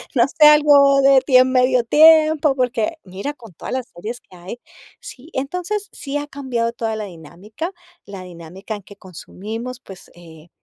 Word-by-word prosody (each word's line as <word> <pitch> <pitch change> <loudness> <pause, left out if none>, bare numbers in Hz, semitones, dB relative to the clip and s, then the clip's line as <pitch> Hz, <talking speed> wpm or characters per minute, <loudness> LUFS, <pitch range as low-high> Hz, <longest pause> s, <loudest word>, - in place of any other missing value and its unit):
No 240 +1 +3
sé, 300 +2 +4
algo 285 -2 +5
de 270 -1 +5
tiem 255 -1 +4
medio 255 -1 +2
tiempo, 310 +1 +4
porque, 250 +3 -2
mira, 195 +10 -6
con 230 -9 -16
todas - - -8
las 260 -2 -4
series 215 +8 -7
que 185 - -20
hay, 180 +7 -10 0.4
sí 270 +5 -13
entonces 360 +10 -4
sí 280 0 -6
ha 290 0 -5
cambiado 250 -5 -3
toda 225 -2 -4
la 210 - -5
dinámica, 195 - -9 0.3
la 195 -2 -10
dinámica 180 +4 -9
en 205 - -11
que 200 0 -16
consumimos, 220 +7 -9
pues, 190 -7 -15
eh, 165 -1 -16
245 Hz, 170 wpm, -19 LUFS, 195-280 Hz, 0.4 s, algo